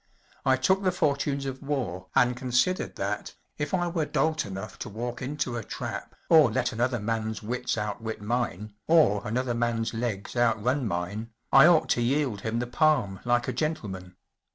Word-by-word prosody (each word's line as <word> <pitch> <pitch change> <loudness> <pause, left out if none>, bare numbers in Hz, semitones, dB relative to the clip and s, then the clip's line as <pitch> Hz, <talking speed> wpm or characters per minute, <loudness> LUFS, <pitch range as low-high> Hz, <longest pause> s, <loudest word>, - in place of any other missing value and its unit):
I 130 - +6
took 190 +9 +2
the 185 -2 +2
fortunes 140 -4 0
of 130 -1 -5
war 120 -11 -3
and 125 0 +4
considered 125 +9 0
that, - - -3 0.2
if 145 - -2
I 175 -2 +1
were 165 -3 -1
dolt 160 -6 0
enough 95 +1 -7
to - - -5
walk 120 +3 -5
into 130 -2 -2
a 115 - -4
trap - - -6
or 155 -6 +7
let 125 +3 0
another 120 +2 0
man’s 110 0 -2
wuts 125 +2 -2
outwit 110 +1 -3
mine, 105 -2 -2
or 155 -12 +5
another 125 +2 -1
man’s 115 -1 -1
legs 115 -3 -3
outrun 120 +2 +1
mine, 100 +5 -3 0.2
I 135 +4 +8
ought 170 -3 +5
to 120 - +2
yield 125 -4 0
him 110 +2 -2
the 120 - -1
palm 125 - +2
like 120 0 +2
a - - -1
gentleman. 95 - -3
120 Hz, 175 wpm, -27 LUFS, 110-140 Hz, 0.2 s, I